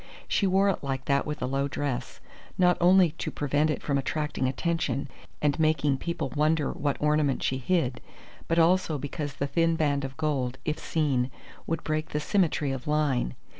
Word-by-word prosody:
She 200 - +1
wore 190 +2 +3
it 195 - -2
like 135 -1 -3
that 140 +1 +1
with 150 -2 -4
a - - +1
low 135 +2 0
dress, 135 -4 -3 0.4
not 180 -1 +4
only 180 -1 +6
to - - -2
prevent 145 +2 0
it 150 - -2
from 140 -2 +1
attracting 150 -1 -1
attention 140 -1 -1 0.4
and 145 +1 +2
making 155 -3 +2
people 170 -1 -3
wonder 155 0 +1
what 145 -1 -1
ornament 150 -2 +1
she 130 - 0
hid, 130 -4 0 0.5
but 165 - +1
also 170 -1 +3
because 145 0 -5
the 140 - -1
thin 165 +3 +2
band 145 -3 +1
of 135 0 -6
gold, 135 -5 -1
if 155 -1 -1
seen, 135 -6 0 0.4
would 165 -1 -2
break 155 0 -2
the 150 - +1
symmetry 155 -4 +1
of 135 0 -5
line. 145 - +1
150 Hz, 180 wpm, -27 LUFS, 135-160 Hz, 0.5 s, only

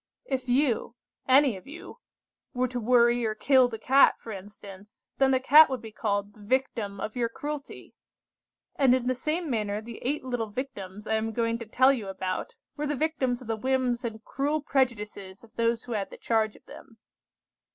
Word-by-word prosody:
"If 260 -2 -3
you, 245 -2 +1 0.3
any 265 -2 +5
of 185 - -15
you, 335 +10 -11 0.6
were 255 +1 +1
to 250 0 -3
worry 240 +1 +3
or 215 -1 -1
kill 260 +2 +4
the 230 -2 -6
cat, 265 +5 +5
for 225 - -9
instance, 200 0 -11
then 270 -1 +4
the 260 -1 +3
cat 300 +4 +7
would 260 -2 -2
be 220 - -8
called 205 -1 -2
the 215 - -20
victim 215 -3 -2
of 215 - -5
your 235 -2 0
cruelty; 290 +4 -7 0.8
and 260 -3 +5
in 255 -1 -2
the 255 - +1
same 310 +7 -2
manner 210 -5 -1
the 225 +1 -9
eight 280 +2 -2
little 245 -4 -2
Victims 210 -4 -6
I 220 - +1
am 220 0 -3
going 230 0 0
to 230 - -8
tell 260 +5 +4
you 225 -7 -4
about 190 - -4 0.2
were 295 0 -3
the 295 - -1
victims 260 -4 -1
of - - -13
the 225 - -1
whims 255 +1 0
and 225 -2 -6
cruel 290 +3 -1
prejudices 210 -8 -2
of 225 - -18
those 230 0 0
who 245 - -9
had 205 -3 -2
the - - -11
charge 220 -2 0
of - - -19
them. 230 -4 -14
240 Hz, 195 wpm, -27 LUFS, 215-265 Hz, 0.8 s, cat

